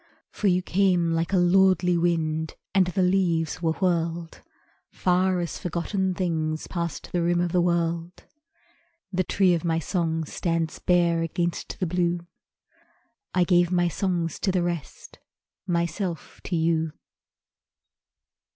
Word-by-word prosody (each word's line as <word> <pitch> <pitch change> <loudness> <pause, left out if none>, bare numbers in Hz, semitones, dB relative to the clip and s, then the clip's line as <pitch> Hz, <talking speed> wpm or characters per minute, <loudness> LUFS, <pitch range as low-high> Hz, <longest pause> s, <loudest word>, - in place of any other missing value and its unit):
For 210 - -1
you 180 -1 +2
came 180 -3 +2
like 165 +1 0
a 195 - +3
lordly 180 0 +4
wind, 160 -2 0 0.2
And 190 -2 +4
the 185 +1 0
leaves 175 -4 +1
were 165 -2 +1
whirled 170 -2 -1 0.5
Far 185 0 +1
as 170 - -4
forgotten 185 +2 -2
things 160 -4 -1
Past 170 -3 -4
the 175 - 0
rim 175 +1 +2
of 175 -1 0
the 180 - +3
world. 170 0 -1 0.9
The 185 +1 +1
tree 185 0 +3
of 170 - -1
my 165 -1 +1
song 165 -1 -1
stands 165 0 -2
bare 170 -2 +2
Against 170 +1 -3
the 185 - 0
blue 175 0 0 1.1
I 180 - +4
gave 175 -1 +3
my 175 -1 +2
songs 170 -2 -2
to 195 - +1
the 180 -1 +1
rest, 170 -4 -5 0.5
Myself 170 0 -2
to 180 - -2
you. 160 -1 +1
175 Hz, 135 wpm, -25 LUFS, 165-180 Hz, 1.1 s, lordly